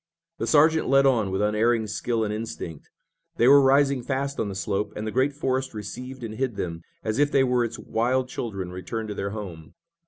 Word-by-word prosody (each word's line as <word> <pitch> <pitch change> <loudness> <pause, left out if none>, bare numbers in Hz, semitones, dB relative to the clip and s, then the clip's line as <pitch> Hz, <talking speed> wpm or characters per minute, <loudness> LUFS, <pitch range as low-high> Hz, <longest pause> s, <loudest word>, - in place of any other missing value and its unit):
The - - -2
sergeant 160 +1 +4
led 135 0 +5
on 115 -7 +3
with 95 +2 -1
unerring 110 +2 +2
skill 110 +2 -1
and 105 -1 -2
instinct. 105 -8 -6 0.5
They 120 - +4
were 140 +1 +8
rising 135 0 +4
fast 140 +2 -3
on 105 - -1
the 95 - -6
slope, 100 +1 -2
and 105 - -4
the 110 - -3
great 130 +4 +2
forest 130 -3 -2
received 125 +5 -7
and 110 -2 -5
hid 120 0 -2
them 85 -4 -4 0.2
as 110 +3 -1
if 145 0 +3
they 135 - +4
were 125 -2 +2
its 115 - -4
wild 125 +3 0
children 100 -8 -5
returned 110 +4 -5
to - - -3
their 100 0 -3
home. 95 -7 -8
115 Hz, 210 wpm, -25 LUFS, 105-130 Hz, 0.5 s, were